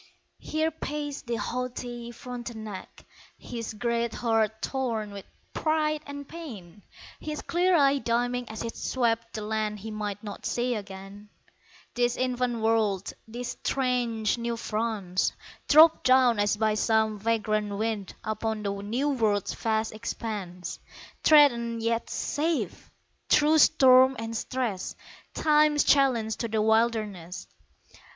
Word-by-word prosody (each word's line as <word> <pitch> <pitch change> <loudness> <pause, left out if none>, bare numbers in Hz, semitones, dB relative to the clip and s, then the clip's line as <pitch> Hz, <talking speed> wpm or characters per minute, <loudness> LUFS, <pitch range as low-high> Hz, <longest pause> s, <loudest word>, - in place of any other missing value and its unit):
Here 315 +1 -1
paced 290 -3 -5
the 235 - -1
haughty 240 +1 -4
Frontenac, 235 -5 -8 0.3
His 230 -2 -6
great 235 +1 -1
heart 220 -2 +1
torn 230 -5 -2
with 200 -1 -8 0.3
pride 310 -1 0
and 285 0 -7
pain, 215 - -9 0.4
His 305 -1 -5
clear 360 +1 +2
eye 280 -2 +4
dimming 245 0 -1
as 220 +1 -5
it 230 - -5
swept 230 -2 -1
The 215 - -4
land 215 0 -2
he 220 +2 -6
might 210 -1 -4
not 205 -2 -7
see 245 +1 0
again, 200 0 -8 0.6
This 240 0 +1
infant 250 -2 -1
world, 220 -4 +1
this 240 +2 -5
strange 245 -4 0
New 235 0 -2
France 215 -5 -1 0.3
Dropped 315 +2 +7
down 255 -3 +5
as 205 0 +2
by 215 0 +2
some 220 0 +1
vagrant 215 -2 0
wind 215 -2 -3
Upon 215 0 -2
the 200 -1 -1
New 240 +8 -1
World's 215 -7 +1
vast 220 -1 -1
expanse, 210 -5 -5 0.4
Threatened 235 -7 +5
yet 230 0 0
safe! 315 +2 -2 0.4
Through 305 +1 +5
storm 260 -3 +6
and 225 0 -5
stress 225 -5 -3 0.4
Time's 300 -1 +4
challenge 245 -6 +3
to 230 - -2
the 220 0 -1
wilderness. 215 -5 0
230 Hz, 125 wpm, -27 LUFS, 215-255 Hz, 0.6 s, Dropped